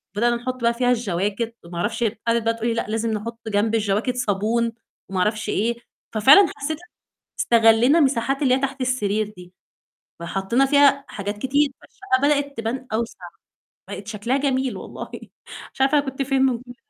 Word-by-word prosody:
بدأنا 240 +2 +2
نحط 255 +1 -5
بقى 235 0 +3
فيها 245 +1 0
الجواكت 210 0 -1
وما 170 0 -8
أعرفش 225 +6 -1
هي 210 -3 -1
قعدت 230 -1 +2
بقى 230 0 +1
تقول 230 +1 -3
لي: 230 - +1
"لأ، 230 - -2
لازم 225 +1 -1
نحط 230 +2 -4
جنب 215 +1 +1
الجواكت 215 +3 0
صابون 230 +1 0 0.4
وما 190 - -2
أعرفش 210 +2 0
إيه." 230 +4 0 0.4
ففعلًا 275 - +7
حسيت 295 +2 -3 0.6
استغلّينا 235 +6 +5
مساحات 270 0 +1
اللي 255 -2 +3
هي 265 - -1
تحت 270 0 -3
السرير 215 -4 -1
دي، 180 0 -13 0.7
فحطينا 195 +9 0
فيها 280 0 +4
حاجات 205 0 -5
كتير، 280 +4 +1
فالشقة 390 -10 -2
بدأت 285 -1 +1
تبان 245 +3 -4
أوسع، 230 +1 -2 0.7
بقت 200 0 -7
شكلها 215 +4 -2
جميل 265 -2 0
والله، - - -8 0.6
مش - - -18
عارفة 275 +2 +4
أنا 285 - -1
كنت 270 +1 -3
فين 270 0 +1
من 260 -3 +2
كل 245 -1 -12
235 Hz, 175 wpm, -22 LUFS, 215-265 Hz, 0.7 s, ففعلًا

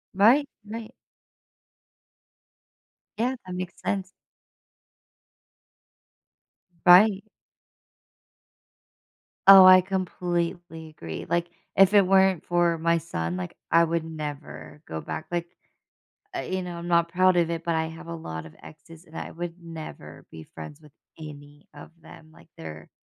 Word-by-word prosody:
Right, 245 +9 +5 0.2
right. 220 +1 -8 2.3
Yeah, 250 +4 0
that 185 -1 -7
makes 185 0 -7
sense. 190 -2 -2 2.8
Right. 195 +3 +6 2.2
Oh, 195 -1 +11
I 185 0 +9
completely 175 -3 -3
agree. 85 - -8
Like, 170 0 0 0.3
if 195 +1 +6
it 200 -3 +5
weren't 190 -2 +3
for 175 -1 +1
my 170 +1 +2
son, 90 - -4
like, 90 -1 -6
I 165 +1 +5
would 170 0 -1
never 135 - -8
go 80 0 -5
back, 160 - -6
like, 175 -1 -2 0.9
I - - -3
you 185 0 -3
know, 175 -1 -6
I'm 170 0 -7
not 170 -1 +3
proud 185 +1 +3
of 170 -1 +2
it, 165 0 -4
but 170 - 0
I 160 0 0
have 165 +2 -10
a 170 - -6
lot 80 - -7
of 80 - -14
exes, 165 +2 -15
and 160 -1 -14
I - - -6
would 175 +1 -7
never 155 - -10
be 80 -1 -11
friends 80 -2 -10
with 150 - -19 0.3
any 145 -1 -12
of 145 +2 -12
them, 155 0 -15
like, 170 - -19
they're 80 -1 -10
170 Hz, 135 wpm, -25 LUFS, 150-185 Hz, 2.8 s, Oh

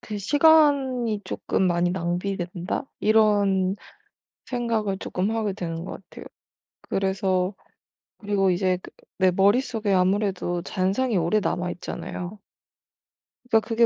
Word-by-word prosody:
그 210 -1 -6
'시간이 270 -3 +3
쪼끔 190 - -1
많이 175 0 +2
낭비된다?' 180 +3 -3 0.2
이런 205 -3 +3 0.7
생각을 230 -5 -1
쪼끔 190 +2 -2
하게 220 -3 -1
되는 165 -3 -5
거 - - -6
같아요. 195 - -11 0.6
그래서 190 -1 0 0.6
그리고 200 -3 +1
이제 185 0 +1
그 - - -12 0.3
내 185 -1 +4
머릿속에 205 +2 +2
아무래도 185 -2 +1
잔상이 200 +6 0
오래 180 +4 +2
남아 180 -3 -1
있잖아요. 180 +3 -6 1.1
그니까 225 - +5
그게 230 0 +3
195 Hz, 265 characters per minute, -24 LUFS, 185-220 Hz, 1.1 s, 그니까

